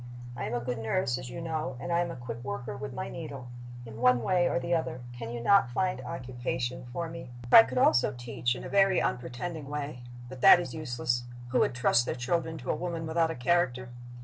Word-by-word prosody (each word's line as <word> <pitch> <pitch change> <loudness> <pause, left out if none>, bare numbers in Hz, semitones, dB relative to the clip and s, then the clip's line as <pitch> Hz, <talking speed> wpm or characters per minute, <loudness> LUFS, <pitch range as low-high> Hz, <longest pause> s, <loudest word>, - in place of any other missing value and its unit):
"I - - -4
am 120 - -2
a - - 0
good 120 0 -3
nurse, 125 +2 0
as 130 -1 -7
you 170 - -6
know, 155 -6 -3
and 175 - -5
I 170 - +3
am 175 0 0
a 170 - -6
quick 120 -1 -7
worker 105 -1 -5
with 140 0 -6
my 125 - -4
needle. 140 -6 -7 0.4
In 115 0 -9
one 125 -1 +4
way 180 -2 +2
or - - 0
the 170 0 -1
other 160 -7 -1
can 120 -2 -7
you 120 - -4
not 195 +2 +4
find 180 +2 -1
occupation 125 0 -4
for 170 +6 -3
me? 165 -5 -8 0.2
"I - - +12
could 120 +3 -4
also 125 0 +4
teach, 120 0 -2
in - - -8
a - - -5
very 195 -2 +4
unpretending 135 +5 -3
way. 145 -3 -4 0.3
But 130 0 -10
that 185 +1 +9
is 175 - -5
useless. 120 -5 -2 0.2
Who 125 - +2
would 125 - +2
trust 120 -1 +3
their - - -1
children 160 +6 -1
to 130 - -3
a - - 0
woman 170 -2 -4
without 160 +1 +1
a 165 - -3
character? 125 -3 +1
130 Hz, 230 wpm, -29 LUFS, 120-165 Hz, 0.4 s, I